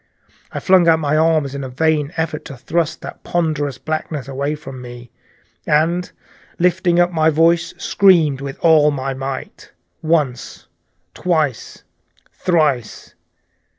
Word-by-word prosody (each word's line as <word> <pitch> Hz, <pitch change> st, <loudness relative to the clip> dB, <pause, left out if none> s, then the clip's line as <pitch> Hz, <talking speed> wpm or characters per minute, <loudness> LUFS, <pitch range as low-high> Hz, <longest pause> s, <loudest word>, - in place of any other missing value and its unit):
I -, -, -4 dB
flung 185 Hz, -2 st, +4 dB
out 165 Hz, -1 st, +5 dB
my 150 Hz, -1 st, 0 dB
arms 155 Hz, -3 st, +2 dB
in 140 Hz, 0 st, -5 dB
a 130 Hz, -, -5 dB
vain 150 Hz, +2 st, 0 dB
effort 160 Hz, -2 st, -2 dB
to 135 Hz, -, -9 dB
thrust 155 Hz, +5 st, -2 dB
that -, -, -9 dB
ponderous 150 Hz, -6 st, -1 dB
blackness 155 Hz, -3 st, -4 dB
away 140 Hz, +2 st, -2 dB
from 135 Hz, -4 st, -10 dB
me, 120 Hz, -1 st, -11 dB, 0.6 s
and 170 Hz, +4 st, +1 dB, 0.5 s
lifting 175 Hz, 0 st, +2 dB
up 175 Hz, 0 st, +3 dB
my 160 Hz, -2 st, +2 dB
voice, 165 Hz, +2 st, +2 dB
screamed 165 Hz, -9 st, +3 dB
with 140 Hz, -1 st, -6 dB
all 155 Hz, -3 st, +5 dB
my 135 Hz, -2 st, -3 dB
might, 135 Hz, 0 st, -7 dB, 0.3 s
once, 150 Hz, -6 st, -1 dB, 0.5 s
twice, 155 Hz, -8 st, -2 dB, 0.5 s
thrice. 150 Hz, -, -1 dB
155 Hz, 130 wpm, -19 LUFS, 135-165 Hz, 0.6 s, out